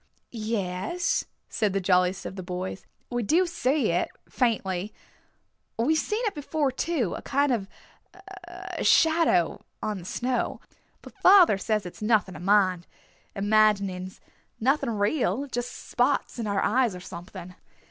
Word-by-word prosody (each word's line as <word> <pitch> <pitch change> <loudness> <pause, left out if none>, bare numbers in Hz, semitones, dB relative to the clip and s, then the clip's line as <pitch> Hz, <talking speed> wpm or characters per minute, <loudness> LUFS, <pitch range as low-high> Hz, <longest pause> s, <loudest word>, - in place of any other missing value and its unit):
"Yes," 215 - -2 0.2
said 210 -4 -1
the 195 - +1
jolliest 180 0 +2
of - - -6
the 190 - -5
boys. 180 +1 -5 0.2
"We 240 0 -1
do 325 - +3
see 290 - 0
it 175 - 0 0.2
faintly. 205 -5 -1 0.8
We've 260 +8 +2
seen 425 +9 -1
it 420 - 0
before 295 -1 -1
too, 260 - -1
a - - -7
kind 285 0 +1
of 200 -5 -1 0.8
a 360 0 -6
shadow 320 - +3 0.2
on 210 -2 -3
the 170 - -11
snow. 250 +6 -2 0.4
But - - -12
father 365 - +7
says 210 -1 -1
it's 180 - -9
nothing 210 -3 +2
to - - -9
mind. 185 -2 +2 0.5
Imaginings. 200 -3 +1 0.4
Nothing 270 +3 +1
real, 235 +6 0
just 245 -2 -4
spots - - -1
in 225 - -2
our 200 -1 0
eyes 240 -3 +2
or - - -7
something." 180 0 -9
215 Hz, 140 wpm, -26 LUFS, 190-280 Hz, 0.8 s, father